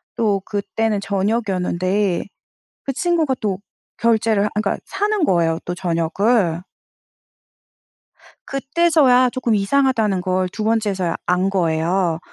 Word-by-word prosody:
또 205 -4 +1
그때는 210 +1 -1
저녁이었는데 195 -2 -1 0.6
그 275 - -3
친구가 325 -3 +1
또 200 -4 -1 0.4
결제를 225 -3 +2
하 - - +1
아 - - +1
그러니까 205 - -1
사는 410 0 -1
거예요 165 - +1
또 175 - -3
저녁을. 175 +2 0 1.9
그때서야 275 -3 +3
쪼끔 240 -3 -1
이상하다는 215 -2 +1
걸 185 0 0
2 215 - -4
번째서야 205 -6 0
안 180 +2 +1
거예요. 170 -1 0
205 Hz, 260 characters per minute, -20 LUFS, 185-240 Hz, 1.9 s, 그때서야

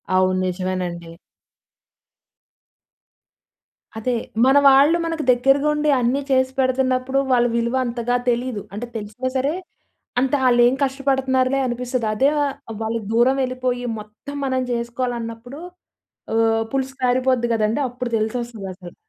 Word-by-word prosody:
అవును, 185 0 +2
నిజమేనండి. 180 -2 -4 2.8
అదే. 245 +3 -1 0.3
మన 265 +2 +5
వాళ్ళు 280 +5 +5
మనకి 330 -2 -2
దగ్గరగా 270 +4 +3
ఉండి 300 0 0
అన్నీ 250 +3 +1
చేసి 260 0 +3
పెడుతున్నప్పుడు 260 0 +1
వాళ్ళ 240 -1 +4
విలువ 235 +2 0
అంతగా 240 0 -1
తెలీదు. 240 -2 -1
అంటే 235 +4 -5
తెలిసినా 220 +4 -4
సరే, 275 +4 0 0.7
అంత 270 +2 0
ఆళ్ళేం 240 +1 +5
కష్టపడుతున్నారులే, 265 -1 +1
అనిపిస్తుంది. 245 -1 -2
అదే 270 +5 +3
వ - - +2 0.4
వాళ్ళు 225 +1 -1
దూరం 240 +3 +4
వెళ్ళిపోయి, 255 -1 -2
మొత్తం 215 +7 -9
మనం 260 -1 0
చేసుకోవాలన్నప్పుడు 235 +1 -4 0.7
హ్మ్. 225 0 +2
పులుసు 265 0 -2
కారిపోద్ది 255 -1 +2
కదండీ! 220 +4 0
అప్పుడు 250 0 -5
తెలిసొస్తది 220 -1 -3
అసలు. 180 -1 -12
245 Hz, 115 wpm, -21 LUFS, 225-260 Hz, 2.8 s, మన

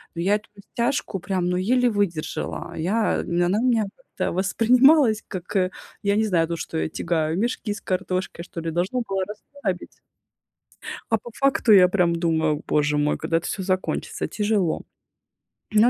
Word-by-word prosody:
Но 170 - -3
я 200 +4 +3
эту 210 - -6
растяжку 235 0 -2
прям, 180 -1 -1
ну, 180 - 0
еле 245 +6 +2
выдержала. 200 -7 -2
Я 205 +7 +1
она 175 +4 +1
у - - -1
меня 235 -4 +3
как-то 230 -7 -4
воспринималась, 235 - +4
как 185 +2 -7 0.5
я 200 0 +2
не 220 - +2
знаю, 170 -6 +2
ну 170 - -2
что 160 - -5
я - - -1
тягаю, 160 0 -1
мешки 230 -1 -1
с 205 - -9
картошкой, 185 -2 -2
что 165 - -7
ли. 165 0 -3
Должно 185 +9 -1
было 195 -1 -1
расслабить, 210 -2 -6 1.1
а 225 - +4
по 240 - -11
факту 275 -4 +3
я 185 -3 +8
прям 180 -3 +2
думаю: 160 -3 +1
"Боже 150 0 +1
мой, 150 0 +1
когда 165 +1 0
это - - -7
всё 190 - -3
закончится, 185 0 -2
тяжело". 205 -5 0 0.9
Ну, 215 +3 +5
190 Hz, 165 wpm, -24 LUFS, 170-220 Hz, 1.1 s, я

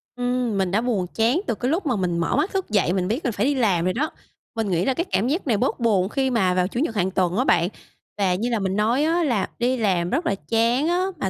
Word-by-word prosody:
Ừm, 245 -3 -1
mình 190 -2 0
đã 215 +3 +2
buồn 210 -8 -1
chán 235 - +2
từ 225 - 0
cái 250 +6 -2
lúc 345 +1 -1
mà 250 -5 +1
mình 180 -3 -1
mở 165 - 0
mắt 395 - 0
thức 385 -8 -2
dậy, 195 -4 +2
mình 185 -1 0
biết 235 +9 -2
mình 245 - 0
phải 205 - 0
đi 285 0 +1
làm 190 -9 +1
rồi 185 - +1
đó. 300 +7 -1 0.4
Mình 220 -3 -1
nghĩ 175 +1 +1
là 265 - +2
cái 340 +7 -2
cảm 225 - +1
giác 305 +2 -1
này 220 -4 +2
bớt 255 +3 -1
buồn 205 -5 +2
khi 265 +1 0
mà 190 -7 +2
vào 180 0 +1
Chủ 235 - -4
nhật 235 -7 -1
hàng 190 -1 0
tuần 180 +1 0
á 255 - +3
bạn. 170 +2 +3 0.5
Và 190 -3 +1
như 235 +6 -2
là 230 -3 0
mình 190 0 -1
nói 230 +7 +2
á, 335 +2 +1
là 235 -9 0
đi 250 +2 +1
làm 180 -6 +1
rất 335 - -1
là 195 - +1
chán 235 +6 +2
á 360 +2 +1
mà 190 - -2
225 Hz, 285 wpm, -23 LUFS, 190-260 Hz, 0.5 s, á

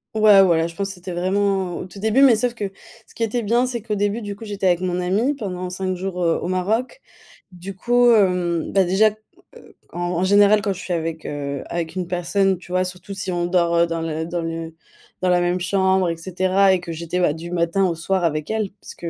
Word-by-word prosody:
Ouais 210 -2 +7
voilà, 165 -3 +2
je 170 - -11
pense 200 +2 -2
que 195 - -7
c'était 180 0 -8
vraiment 190 0 0
au - - -6
tout 190 +2 -12
début, 220 +6 +2
mais 265 -4 +7
sauf 240 +2 0
que 210 -4 -4 0.4
ce - - -21
qui 230 - -2
était 230 +2 -1
bien, 235 +4 +2
c'est 245 -2 -4
qu'au 210 0 -3
début 205 +3 -1
du 205 -2 -5
coup, 205 - -12
j'étais 205 -3 -2
avec 175 -1 +2
mon 180 -1 -1
amie 205 +11 0
pendant 185 -7 -5
5 185 +1 -3
jours, 180 0 -4
heu, 165 -1 +2
au - - -3
Maroc. 220 - -1 0.5
Du 185 +2 -8
coup 245 +4 +3
hem 180 -6 +1
bah 195 - +4
déjà, 195 +4 +3 0.4
heu, - - -17 0.2
en 175 - -6
en 175 0 -1
général 205 +2 +5
quand 200 0 -1
je 185 - -10
suis 180 - -7
avec, 165 -1 -3
heu 140 -1 -4
avec 170 0 -4
une 180 -2 -3
personne, 185 +2 +1
tu 180 0 -11
vois 185 0 +2
surtout 185 +2 -7
si 195 -1 -4
on 175 -1 -1
dort, 175 -1 +1
heu, 170 0 +4
dans 165 0 -3
le 160 0 -3
dans 170 +1 -3
le 165 0 -5 0.5
dans 185 - +1
la 180 0 +4
même 175 +1 0
chambre 190 0 +2
et 165 - -3
cetera, 185 +3 +2
et 185 - 0
que 170 - -7
j'étais, 170 +2 -3
bah, 175 - +3
du 165 +3 -7
matin 175 +2 +1
au 170 - -2
soir 180 +2 -1
avec 155 -2 -2
elle 220 -2 -1
puisque, 170 - -7
185 Hz, 240 wpm, -21 LUFS, 175-200 Hz, 0.5 s, Ouais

